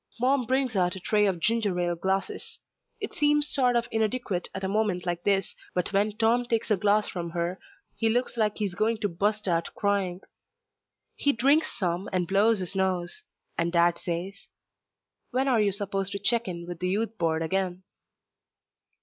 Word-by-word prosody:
Mom 255 0 +2
brings 260 -2 +1
out 180 -1 +1
a - - -6
tray 210 +3 +2
of 185 -3 -1
ginger 210 -1 +1
ale 175 -1 0
glasses. 190 +3 -2 0.4
It 415 - -5
seems 295 0 +3
sort 250 -4 +2
of 235 0 +1
inadequate 220 -4 -1
at 190 - -6
a - - 0
moment 195 -3 0
like 175 -1 -2
this, 195 -2 +1 0.2
but 180 +2 -1
when 205 +2 +1
Tom 235 +2 +3
takes 230 -1 -1
a - - +6
glass 205 +2 +2
from 170 -2 -4
her 175 +2 -2 0.4
he 225 - +1
looks 245 +3 0
like 215 -2 0
he's 205 -4 -2
going 220 +5 +1
to 205 - +2
bust 205 +4 -1
out 170 -2 0
crying. 195 -3 0 0.9
He 285 - +2
drinks 280 +6 +3
some 180 -2 -1
and 180 -2 0
blows 200 +2 +3
his 185 +2 -2
nose, 190 - +1 0.4
and 170 0 +1
Dad 170 0 +3
says, 180 +3 -5 0.8
"When 260 +2 0
are 240 -5 +3
you 205 -1 +2
supposed 195 -1 -1
to - - -2
check 230 +3 +1
in 170 -2 -5
with 175 -1 -7
the 180 - -1
Youth 220 +3 -1
Board 165 -1 +1
again?" 185 +2 -2
200 Hz, 185 wpm, -27 LUFS, 180-225 Hz, 0.9 s, a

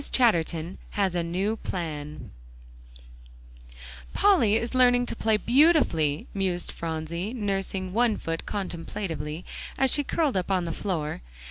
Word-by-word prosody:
CHATTERTON 170 -7 +1 0.2
HAS 195 -3 +2
A 175 - 0
NEW 190 +6 -1
PLAN 155 -6 -5 1.8
"Polly 285 - +4
is 230 +2 -1
learning 245 -1 +5
to - - -3
play 220 -1 +2
beautifully," 235 - +3
mused 185 -3 -1
Phronsie, 170 +6 -4
nursing 195 -3 -2
one 230 0 +2
foot 165 0 -4
contemplatively, 175 -4 -4 0.3
as 265 -1 +3
she 290 - +3
curled 295 -2 0
up 185 - -2
on 185 -2 +1
the 165 - -3
floor. 160 - -3
190 Hz, 125 wpm, -27 LUFS, 165-230 Hz, 1.8 s, learning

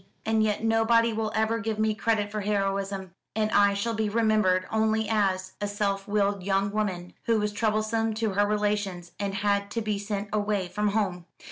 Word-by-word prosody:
And 220 0 +2
yet 215 0 0
nobody 225 +1 +3
will 220 0 -2
ever 220 +1 +1
give 225 -1 -2
me 215 0 +2
credit 210 -1 0
for 215 0 -3
heroism; 195 -2 -1 0.2
and 215 0 0
I 200 0 +4
shall 230 +3 -1
be 220 -1 0
remembered 215 -4 +2
only 220 0 +1
as 190 -3 0
a 205 - 0
self 200 -1 -1
willed 200 -1 +1
young 195 +1 0
woman, 190 -4 -2
who 230 -1 +3
was 210 0 0
troublesome 220 +1 0
to 220 -1 0
her 205 +2 +2
relations, 205 -4 -1
and 200 -1 -2
had 200 0 0
to 230 +2 -2
be 210 -2 -1
sent 205 0 -4
away 205 -3 0
from 210 +2 -1
home." 195 -4 -1
210 Hz, 190 wpm, -27 LUFS, 200-220 Hz, 0.2 s, I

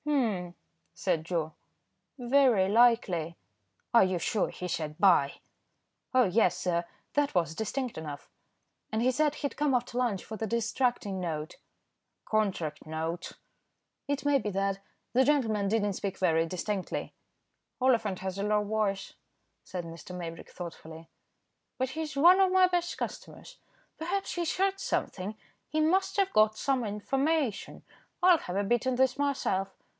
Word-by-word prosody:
"Humph," 220 -12 0 0.4
said 165 -4 0
Joe, 165 -2 -2 0.6
"very 245 -6 +4
likely." 200 -7 +3 0.6
"Are 235 - +7
you 185 -1 +1
sure 195 +5 0
he 180 - -6
said 155 -3 -3
'buy?'" 175 -8 +4 0.8
"Oh! 255 -1 +6
yes, 190 -1 +2
sir, 170 -1 0 0.3
that 290 -5 +1
was 165 -2 +1
distinct 245 +4 -3
enough, 145 -3 -7 0.6
and 220 +1 0
he 255 - +4
said 300 +2 +1
he'd 285 - -3
come 290 -3 +1
after 245 0 -2
lunch 225 -7 0
for 220 - -7
the 220 - -3
distracting 230 -2 0
note." 160 -3 -4 0.7
"Contract 195 -8 -1
note." 160 +3 -4 0.7
"It 285 0 -2
may 290 -1 +4
be 210 - -3
that. 195 0 -1 0.3
The 255 +2 +5
gentleman 225 -8 +2
did 220 +1 +1
not 205 -1 0
speak 195 0 -4
very 165 -2 +2
distinctly." 185 +2 -3 0.7
"Oliphant 230 -7 +2
has 190 0 -4
a - - -1
low 210 0 +2
voice," 205 -2 -1 0.5
said 180 -2 -6
Mr. 165 +2 -9
Maybrick, 165 -2 -7
thoughtfully, 165 -2 -9 0.7
"but 260 0 0
he's 310 -1 -4
one 350 +7 +7
of 380 -1 +4
my 375 0 +6
best 350 -1 -1
customers. - - -7 0.4
Perhaps 380 +5 -2
he's 345 -2 -2
heard 390 +1 +1
something; 200 - -2 0.3
he 310 - -1
must 380 +5 +2
have 390 -1 +2
got 215 0 +4
some 270 -3 0
information. 265 +4 -1 0.4
I'll 360 -2 +7
have 180 - -6
a 200 - +1
bit 240 +4 +1
in 260 - +1
this 260 0 +2
myself. 265 -9 0
215 Hz, 150 wpm, -29 LUFS, 180-270 Hz, 0.8 s, Are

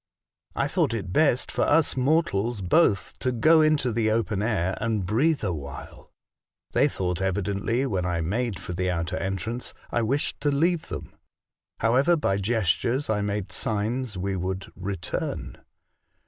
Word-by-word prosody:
I - - +1
thought - - +1
it 95 -5 -4
best 140 -3 +3
for - - -2
us 160 +1 +3
mortals 125 -6 +1
both 100 - +2
to 130 - 0
go 155 +7 +5
into 155 -5 +3
the 110 -1 +1
open 110 -2 0
air 95 -5 0
and 110 -4 0
breathe 140 - +2
awhile. 75 -8 -6 0.6
They - - +4
thought 90 -1 -2
evidently, 100 +6 0
when 95 -9 -1
I 90 -1 -1
made 105 +5 -1
for 90 -1 -6
the 90 +1 -1
outer 85 0 -2
entrance, 100 +6 -3 0.2
I 120 - +1
wished 135 +6 -1
to 145 - +2
leave 160 +4 +1
them. - - -7 0.7
However, 130 +9 +4
by 100 -11 0
gestures 115 - 0
I 105 -1 +1
made 100 -1 -2
signs 110 +1 -2
we 95 +1 -2
would 95 +1 -4
return. 95 -2 -4
110 Hz, 150 wpm, -26 LUFS, 95-125 Hz, 0.7 s, go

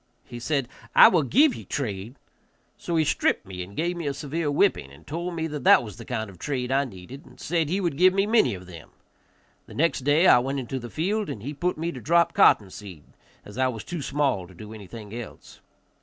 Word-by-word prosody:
He 120 - -9
said, 135 0 -1 0.3
"I - - +10
will 175 - +3
give 265 - +4
ye - - -8
trade." 110 -3 -4 0.6
So 170 - -4
he 160 -1 +3
stripped - - +1
me 95 -1 -7
and 95 +3 -9
gave 175 +3 -1
me 170 -3 -4
a 140 - -2
severe 150 +2 -3
whipping, 145 - +1
and 70 - -17
told 170 +3 -4
me 160 -1 -2
that 150 -4 -5
that - - +6
was 105 -5 -9
the - - -10
kind 110 -3 -3
of 95 -4 -14
trade 130 -1 -3
I 140 +1 +2
needed, 120 +5 -11
and - - -18
said 165 -2 -1
he 190 +4 0
would 170 -7 -2
give 185 +1 +6
me 195 +1 +1
many 210 - +3
of 90 0 -11
them. 85 -4 -12 0.8
The - - -12
next 165 +4 +1
day 145 +6 +3
I 125 - +7
went 135 +3 -2
into 130 +1 -4
the 120 -1 -8
field, 200 - -1
and 105 - -6
he 145 +4 -5
put 175 +4 -2
me 165 +2 -2
to 130 - -9
drop 170 +5 +3
cotton 100 -3 +4
seed, 90 -8 -10 0.4
as 105 +5 -9
I 130 - +3
was 115 -4 -5
too 175 -3 -5
small 135 -9 -1
to 95 - -16
do 105 +4 -10
anything 105 0 -10
else. 120 -1 -10
135 Hz, 235 wpm, -25 LUFS, 110-165 Hz, 0.8 s, I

